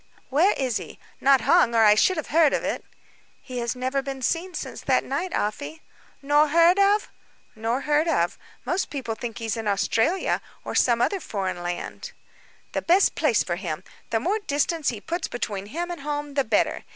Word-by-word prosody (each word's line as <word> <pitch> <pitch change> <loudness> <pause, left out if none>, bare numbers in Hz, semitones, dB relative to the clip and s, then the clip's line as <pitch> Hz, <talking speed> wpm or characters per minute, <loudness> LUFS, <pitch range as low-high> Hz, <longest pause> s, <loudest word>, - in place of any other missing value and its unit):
"Where 330 +10 +4
is 255 -4 -1
he? - - -9 0.2
Not 270 -2 +5
hung, 235 0 +4
or 225 -1 +6
I 210 - +8
should 340 - +3
have 315 - -4
heard 315 -1 +4
of - - 0
it." - - -2 0.6
"He 250 -2 -6
has 235 +1 -2
never 260 +2 -1
been 270 -1 -6
seen 350 +6 -1
since - - -6
that - - +2
night, 370 - -3
Afy." 285 +9 -3 0.4
"Nor 295 +2 +4
heard 335 +5 +5
of?" 405 +1 +3 0.4
"Nor 225 +4 -1
heard 300 +3 +1
of. 175 - 0 0.3
Most 355 +9 -1
people 265 -6 -4
think 230 +1 -6
he 230 - -5
is 220 - -1
in 225 -1 -4
Australia, 225 - +1 0.2
or - - -4
some 235 -1 +3
other 395 - 0
foreign 190 - -4
land." 175 0 -5 0.6
"The - - -2
best 365 +4 +4
place 275 -9 +2
for 175 -1 -3
him; 175 -2 -4 0.3
the 225 -2 +1
more 390 - 0
distance 310 -3 0
he 230 - -4
puts 340 +4 -3
between 205 -5 -4
him 345 +9 -4
and 345 - -6
home, 290 0 -4
the 275 -1 +1
better. 215 -1 +1
275 Hz, 195 wpm, -25 LUFS, 225-330 Hz, 0.6 s, I